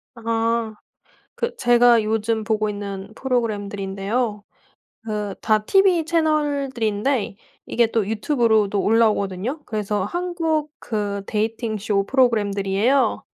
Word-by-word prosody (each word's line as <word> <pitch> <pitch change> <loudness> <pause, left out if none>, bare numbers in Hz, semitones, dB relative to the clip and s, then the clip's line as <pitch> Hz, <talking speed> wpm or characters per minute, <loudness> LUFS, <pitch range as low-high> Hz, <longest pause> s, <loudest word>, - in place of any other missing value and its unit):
아. 230 -1 -1 0.6
그 475 - -3
제가 240 -1 +5
요즘 220 +1 -1
보고 215 0 0
있는 200 -1 -6
프로그램들인데요. 210 -2 -2 0.6
그 210 -2 -3
다 215 -1 +2
티비 385 -4 +4
채널들인데 280 - 0 0.3
이게 235 0 +2
또 225 -4 0
유튜브로도 220 -3 +1
올라오거든요. 220 - +1
그래서 210 -2 -2
한국 330 - -2
그 205 -3 -3
데이팅 220 +1 -2
쇼 200 -1 0
프로그램들이에요. 215 0 +1
220 Hz, 265 characters per minute, -22 LUFS, 205-255 Hz, 0.6 s, 제가